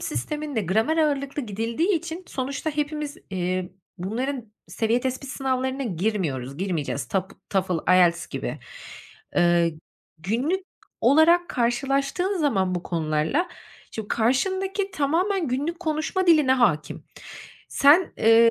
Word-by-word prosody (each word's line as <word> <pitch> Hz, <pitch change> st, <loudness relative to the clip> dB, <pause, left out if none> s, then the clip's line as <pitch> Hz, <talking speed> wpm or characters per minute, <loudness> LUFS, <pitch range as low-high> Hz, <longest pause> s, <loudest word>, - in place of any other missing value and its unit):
sisteminde 295 Hz, -6 st, -3 dB
gramer 220 Hz, -, +1 dB
ağırlıklı 285 Hz, -2 st, 0 dB
gidildiği 230 Hz, -, -1 dB
için 335 Hz, +2 st, -4 dB
sonuçta 275 Hz, +4 st, -3 dB
hepimiz, 300 Hz, 0 st, -3 dB
iii, 185 Hz, -1 st, -2 dB, 0.3 s
bunların 230 Hz, +4 st, -3 dB, 0.2 s
seviye 230 Hz, +1 st, +1 dB
tespit 260 Hz, +1 st, -3 dB
sınavlarına 265 Hz, 0 st, -1 dB
girmiyoruz, 170 Hz, -, -2 dB
girmeyeceğiz, 165 Hz, -7 st, -2 dB
Tap, 190 Hz, -1 st, -2 dB, 0.2 s
Toefl, 185 Hz, -3 st, +1 dB
IELTS 175 Hz, -2 st, +4 dB
gibi. -, -, -5 dB, 0.8 s
Eee, 175 Hz, -2 st, +3 dB, 0.4 s
günlük 255 Hz, -, -1 dB, 0.4 s
olarak 320 Hz, +7 st, +5 dB
karşılaştığın 275 Hz, +10 st, 0 dB
zaman 195 Hz, -, +1 dB
bu 175 Hz, -, -3 dB
konularla, 160 Hz, -, 0 dB, 0.4 s
şimdi 220 Hz, -, -5 dB
o -, -, -21 dB
karşındaki 380 Hz, -, 0 dB
tamamen 335 Hz, +4 st, 0 dB
günlük 290 Hz, +7 st, -2 dB
konuşma 315 Hz, +4 st, -1 dB
diline 305 Hz, -6 st, +5 dB
hâkim. 190 Hz, -, +1 dB, 0.6 s
Sen, 300 Hz, +7 st, +5 dB
eee, 225 Hz, +1 st, +6 dB
260 Hz, 115 wpm, -24 LUFS, 190-305 Hz, 0.8 s, eee